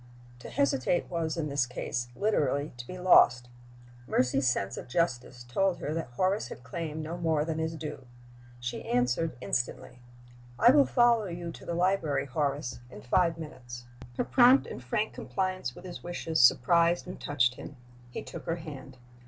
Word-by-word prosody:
To -, -, -9 dB
hesitate 140 Hz, +6 st, 0 dB
was, 165 Hz, -1 st, -2 dB
in 155 Hz, -2 st, -1 dB
this 140 Hz, -3 st, +1 dB
case, 120 Hz, 0 st, -3 dB
literally 145 Hz, -, 0 dB
to 120 Hz, 0 st, -8 dB
be 185 Hz, -, -7 dB
lost. 125 Hz, -9 st, +5 dB, 0.6 s
Mercy's 130 Hz, +1 st, +2 dB
sense 100 Hz, -4 st, -1 dB
of -, -, -8 dB
justice 125 Hz, -4 st, -1 dB
told 180 Hz, +10 st, 0 dB
her 150 Hz, -, -4 dB
that 165 Hz, -4 st, -3 dB
Horace 190 Hz, -, +1 dB
had -, -, -10 dB
claimed 155 Hz, +5 st, -5 dB
no 165 Hz, +3 st, -5 dB
more 160 Hz, -3 st, +1 dB
than 160 Hz, -1 st, -3 dB
his 160 Hz, 0 st, -2 dB
due. 150 Hz, -4 st, -7 dB, 0.5 s
She 120 Hz, 0 st, -4 dB
answered 125 Hz, +4 st, 0 dB
instantly: 125 Hz, +1 st, -2 dB, 0.6 s
"I 240 Hz, -, +7 dB
will 280 Hz, 0 st, +5 dB
follow 240 Hz, -3 st, +4 dB
you 170 Hz, -2 st, -5 dB
to -, -, -12 dB
the 170 Hz, -, -2 dB
library, 170 Hz, -6 st, +1 dB
Horace, 140 Hz, -2 st, -2 dB
in 105 Hz, -, -11 dB
five 165 Hz, +6 st, +2 dB
minutes." 125 Hz, -6 st, -9 dB, 0.3 s
Her -, -, +1 dB
prompt 255 Hz, +1 st, +5 dB
and -, -, -8 dB
frank 210 Hz, +13 st, -1 dB
compliance 185 Hz, -10 st, -3 dB
with -, -, -12 dB
his 175 Hz, -1 st, -8 dB
wishes 170 Hz, -2 st, -2 dB
surprised 170 Hz, +8 st, +4 dB
and 180 Hz, -, -8 dB
touched 125 Hz, -4 st, +2 dB
him. 140 Hz, -, -10 dB, 0.3 s
He -, -, -6 dB
took -, -, -9 dB
her 165 Hz, -, -1 dB
hand. 140 Hz, -6 st, -9 dB
155 Hz, 170 wpm, -29 LUFS, 125-175 Hz, 0.6 s, I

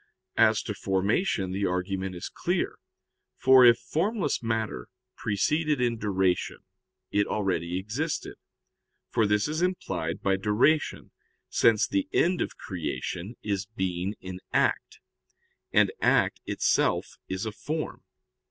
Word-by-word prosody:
As 110 Hz, -1 st, +5 dB
to 105 Hz, -, -3 dB
formation, 95 Hz, -, 0 dB
the 100 Hz, +1 st, 0 dB
argument 95 Hz, +1 st, -2 dB
is 85 Hz, -, -5 dB
clear. -, -, -2 dB, 0.6 s
For 130 Hz, -1 st, +7 dB
if 120 Hz, -1 st, +8 dB
formless 185 Hz, -1 st, -1 dB
matter 110 Hz, -, -2 dB, 0.3 s
preceded 150 Hz, +8 st, 0 dB
in 120 Hz, -2 st, 0 dB
duration, 95 Hz, -4 st, 0 dB, 0.5 s
it 100 Hz, 0 st, +2 dB
already 90 Hz, -4 st, -1 dB
existed; 125 Hz, -, -3 dB, 0.8 s
for 110 Hz, -, +2 dB
this 105 Hz, +3 st, +2 dB
is 155 Hz, +2 st, -2 dB
implied 95 Hz, -, -2 dB
by 95 Hz, -1 st, +2 dB
duration, 110 Hz, +10 st, +1 dB, 0.4 s
since 110 Hz, -2 st, +4 dB
the 290 Hz, 0 st, -1 dB
end 175 Hz, +1 st, +2 dB
of -, -, -3 dB
creation 90 Hz, -, -4 dB
is 100 Hz, -2 st, -2 dB
being 95 Hz, -2 st, -2 dB
in 95 Hz, 0 st, -7 dB
act: -, -, 0 dB, 0.7 s
and -, -, +4 dB
act -, -, +3 dB
itself -, -, +1 dB
is 95 Hz, +3 st, -3 dB
a 110 Hz, -, -2 dB
form. 155 Hz, +8 st, -4 dB
105 Hz, 125 wpm, -27 LUFS, 95-130 Hz, 0.8 s, if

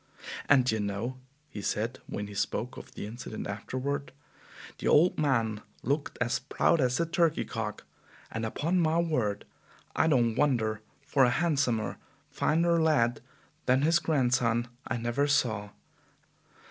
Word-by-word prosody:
"And, 135 Hz, -3 st, +6 dB
d' 125 Hz, -, +2 dB
ye 110 Hz, -, -1 dB
know," 105 Hz, +5 st, -3 dB, 0.3 s
he 105 Hz, -, -7 dB
said, 115 Hz, +6 st, -2 dB
when 105 Hz, -, -4 dB
he 105 Hz, -, -9 dB
spoke 115 Hz, +4 st, -2 dB
of -, -, -11 dB
the -, -, -5 dB
incident 110 Hz, 0 st, -6 dB
afterward, 130 Hz, +8 st, -3 dB, 0.7 s
"the -, -, -2 dB
old 170 Hz, +3 st, +5 dB
man 115 Hz, -8 st, +1 dB, 0.2 s
looked 145 Hz, +4 st, -1 dB
as 120 Hz, +3 st, +1 dB
proud 150 Hz, +4 st, +2 dB
as 125 Hz, +2 st, +1 dB
a 170 Hz, -, +2 dB
turkey 165 Hz, -1 st, +1 dB
cock; 110 Hz, -2 st, -4 dB, 0.5 s
and 110 Hz, -, -3 dB
upon 160 Hz, +11 st, 0 dB
my 160 Hz, -1 st, +2 dB
word 125 Hz, -12 st, 0 dB, 0.5 s
I -, -, +3 dB
don't 120 Hz, -7 st, +3 dB
wonder, 110 Hz, -5 st, +1 dB, 0.2 s
for 140 Hz, -1 st, +3 dB
a 125 Hz, -, +5 dB
handsomer, 135 Hz, -6 st, 0 dB, 0.3 s
finer 170 Hz, +1 st, +2 dB
lad 135 Hz, -7 st, +2 dB, 0.5 s
than 130 Hz, +2 st, +4 dB
his 165 Hz, +3 st, +4 dB
grandson 125 Hz, -7 st, +1 dB, 0.2 s
I -, -, -1 dB
never 120 Hz, +5 st, 0 dB
saw! 110 Hz, -8 st, +1 dB
125 Hz, 145 wpm, -29 LUFS, 110-150 Hz, 0.7 s, And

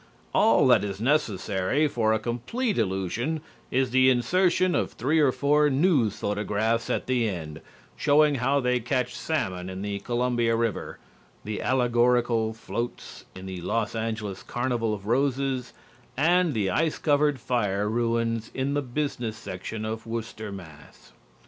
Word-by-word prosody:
All -, -, +4 dB
that -, -, +5 dB
is 100 Hz, -1 st, -4 dB
necessary 110 Hz, 0 st, +1 dB
for 115 Hz, -6 st, +1 dB
a 110 Hz, -, +3 dB
complete 125 Hz, -, -2 dB
illusion 95 Hz, -, -1 dB, 0.3 s
is 130 Hz, -1 st, +1 dB
the 130 Hz, +1 st, +5 dB
insertion 180 Hz, +8 st, +2 dB
of -, -, -1 dB
three 150 Hz, +7 st, +1 dB
or 145 Hz, -4 st, +4 dB
four 150 Hz, +2 st, +3 dB
news 135 Hz, -, +2 dB
photographs 105 Hz, +3 st, -1 dB
at -, -, -1 dB
the 125 Hz, -3 st, +1 dB
end, 80 Hz, -5 st, -6 dB, 0.3 s
showing 150 Hz, 0 st, +4 dB
how 140 Hz, +3 st, +2 dB
they 125 Hz, -1 st, +1 dB
catch 125 Hz, +1 st, -1 dB
salmon 95 Hz, -, -2 dB
in 95 Hz, +1 st, -6 dB
the 100 Hz, -1 st, -3 dB
Columbia 120 Hz, -1 st, 0 dB
River, 115 Hz, -2 st, -2 dB, 0.5 s
the 105 Hz, 0 st, -4 dB
allegorical 120 Hz, -2 st, +2 dB
floats 115 Hz, +2 st, -6 dB
in 95 Hz, -, -9 dB
the 95 Hz, -2 st, -6 dB
Los 110 Hz, +5 st, -1 dB
Angeles 110 Hz, -3 st, -3 dB
Carnival 120 Hz, -2 st, -1 dB
of 100 Hz, -1 st, -11 dB
Roses 130 Hz, +1 st, 0 dB, 0.5 s
and 170 Hz, +1 st, +3 dB
the 100 Hz, -4 st, 0 dB
ice 160 Hz, -, +1 dB
covered 145 Hz, -2 st, +2 dB
fire 105 Hz, -4 st, 0 dB
ruins 115 Hz, 0 st, 0 dB
in 135 Hz, +2 st, -1 dB
the 145 Hz, -, +1 dB
business 125 Hz, -4 st, -3 dB
section 105 Hz, +4 st, -6 dB
of 110 Hz, +1 st, -5 dB
Worcester, 110 Hz, -2 st, -5 dB
Mass. 80 Hz, -7 st, -12 dB
120 Hz, 145 wpm, -26 LUFS, 105-135 Hz, 0.5 s, that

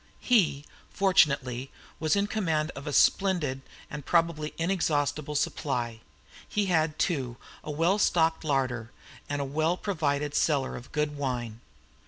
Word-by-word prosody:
He, 170 Hz, -, +2 dB, 0.2 s
fortunately, 140 Hz, -9 st, +2 dB, 0.3 s
was 155 Hz, +2 st, +2 dB
in 200 Hz, 0 st, +2 dB
command 165 Hz, -7 st, -1 dB
of 140 Hz, -, -8 dB
a -, -, -1 dB
splendid 165 Hz, -6 st, +2 dB, 0.3 s
and 145 Hz, 0 st, -7 dB
probably 165 Hz, -1 st, +1 dB
inexhaustible 150 Hz, -4 st, 0 dB
supply; 120 Hz, -6 st, -1 dB, 0.5 s
he 210 Hz, -1 st, 0 dB
had, 160 Hz, -4 st, +1 dB
too, 130 Hz, -9 st, -1 dB, 0.3 s
a -, -, -8 dB
well 165 Hz, +7 st, +2 dB
stocked 165 Hz, -5 st, +2 dB
larder 130 Hz, -6 st, -1 dB, 0.4 s
and 145 Hz, 0 st, -1 dB
a -, -, -3 dB
well 155 Hz, +5 st, 0 dB
provided 150 Hz, -7 st, -1 dB
cellar 140 Hz, -5 st, +1 dB
of 125 Hz, -, -10 dB
good 150 Hz, -1 st, -1 dB
wine. 120 Hz, -5 st, -3 dB
150 Hz, 135 wpm, -28 LUFS, 135-170 Hz, 0.5 s, He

